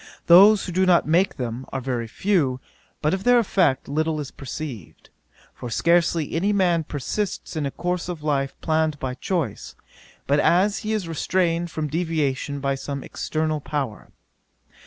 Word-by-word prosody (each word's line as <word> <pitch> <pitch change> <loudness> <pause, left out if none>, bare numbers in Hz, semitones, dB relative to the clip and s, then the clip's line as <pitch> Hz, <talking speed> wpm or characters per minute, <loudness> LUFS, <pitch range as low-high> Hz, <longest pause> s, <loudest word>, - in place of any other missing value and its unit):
Those 195 +4 +7
who 180 - -5
do 185 +2 +2
not 175 -3 +4
make 175 +5 +2
them 125 +1 -4
are - - -2
very 125 -3 -3
few, 145 - 0 0.4
but 150 - +2
of 190 0 -2
their 245 +2 +5
effect 185 - +2
little 155 +2 -1
is 145 -2 -6
perceived; 135 - -8 0.4
for 120 - -7
scarcely 170 +2 +2
any 190 +6 +1
man 180 -5 +2
persists 170 +8 -4
in 150 -3 -1
a - - -2
course 180 +4 -3
of 165 -4 -6
life 140 -3 -1
planned 155 -2 +1
by 130 -2 -4
choice, 150 - -3 0.5
but 145 +1 +2
as 195 +7 +3
he 215 - -4
is 210 -5 -2
restrained 170 +1 0
from 155 -1 -3
deviation 150 -3 -1
by 140 0 0
some 140 0 -5
external 155 -1 -2
power. 140 -7 -4
155 Hz, 160 wpm, -23 LUFS, 140-180 Hz, 0.5 s, Those